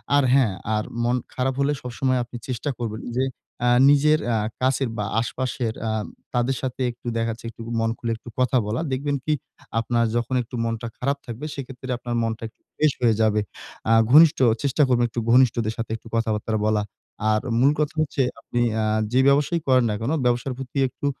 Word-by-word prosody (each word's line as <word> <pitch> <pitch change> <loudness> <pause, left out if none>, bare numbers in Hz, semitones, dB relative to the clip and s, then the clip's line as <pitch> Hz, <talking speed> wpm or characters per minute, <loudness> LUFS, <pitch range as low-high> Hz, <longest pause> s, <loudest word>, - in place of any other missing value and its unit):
আর 145 - +5
হ্যাঁ, 130 -7 +4 0.2
আর 105 - 0 0.2
মন 120 +1 +2 0.2
খারাপ 130 +1 0
হলে 140 +1 +2
সবসময় 130 +1 0
আপনি 120 0 -8
চেষ্টা 130 +3 -3
করবেন 110 -2 -4 0.2
যে 130 - +3 0.4
অ্যা 120 0 +3 0.2
নিজের 150 +2 +5
অ্যা 115 -2 +1 0.2
কাছের 130 0 +1
বা 105 - -1
আশপাশের 120 -1 -2 0.2
আ - - 0 0.4
তাদের 125 +2 +1
সাথে 130 0 -4
একটু 120 0 -13
দেখা 115 0 0
যাচ্ছে 115 +1 -9
একটু 115 - -12 0.2
মন 115 0 +1
খুলে 115 - -3
একটু 120 - -12
কথা 130 0 +3
বলা। 110 +6 -1
দেখবেন 140 +2 -1
কি 155 - +2 0.5
আপনার 115 +1 +1
যখন 120 +2 0
একটু 125 +1 -8
মনটা 115 +1 -3
খারাপ 140 +3 0
থাকবে 120 +4 -6
সেক্ষেত্রে 130 -1 -8
আপনার 120 0 -4
মনটা 115 0 -3
একটু - - -41
ফ্রেশ 155 -1 +3
হয়ে 115 -3 +4
যাবে। 105 -1 +3 0.5
আ - - +7 0.2
ঘনিষ্ঠ 155 +2 +8 0.3
চেষ্টা 140 +2 +2
করবেন 120 -1 +3
একটু 120 - -3
ঘনিষ্ঠদের 120 -3 +4
সাথে 115 -1 -4
একটু 115 - -16
কথাবার্তা 110 -1 -1
বলা। 110 -1 +2 0.5
আর 110 0 +2 0.2
মূল 135 +3 +5
কথা 150 -1 0
হচ্ছে 145 -2 0 0.2
আপনি 120 - -2
অ্যা 110 -1 0 0.3
যে 130 - +4
ব্যবসায়ই 145 +4 +3
করেন 130 -2 +4
না 105 - -1
কেন, 115 +6 -1
ব্যবসার 125 +2 +1
প্রতি 135 0 -7
একটু 135 - -8
125 Hz, 190 wpm, -23 LUFS, 115-135 Hz, 0.5 s, ঘনিষ্ঠ